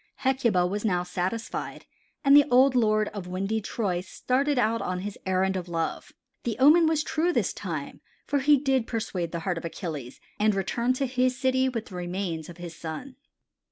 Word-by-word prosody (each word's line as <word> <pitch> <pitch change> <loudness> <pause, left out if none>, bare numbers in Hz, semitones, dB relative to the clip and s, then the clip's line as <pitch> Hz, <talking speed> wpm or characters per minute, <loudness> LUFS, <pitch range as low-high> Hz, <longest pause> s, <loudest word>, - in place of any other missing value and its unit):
Hecuba 250 -9 +2
was 205 +3 -2
now 180 -5 +1
satisfied 185 +5 -4 0.4
and 275 +1 +7
the 290 0 +6
old 255 +2 +5
lord 215 -3 +2
of 200 -4 -7
windy 195 +4 -2
Troy 200 -5 -2
started 265 +9 0
out 230 -1 +2
on 180 0 -2
his 205 +1 -5
errand 190 +1 +1
of 180 -1 -4
love. 165 -1 -3 0.3
The 235 -3 -2
omen 310 +5 +6
was 315 -1 +1
true 320 +3 0
this - - 0
time - - -5 0.2
for 285 - +1
he 290 +2 +5
did 265 -3 +1
persuade 195 -7 -3
the 170 - -4
heart 175 0 -1
of - - -9
Achilles 155 -7 -6 0.2
and 210 -1 +3
returned 235 +6 0
to 275 - 0
his 255 0 +1
city 260 0 +2
with 230 -3 -4
the 190 - -11
remains 175 -2 -3
of 175 - -10
his 175 -2 -8
son. 170 - -7
215 Hz, 190 wpm, -27 LUFS, 180-260 Hz, 0.4 s, and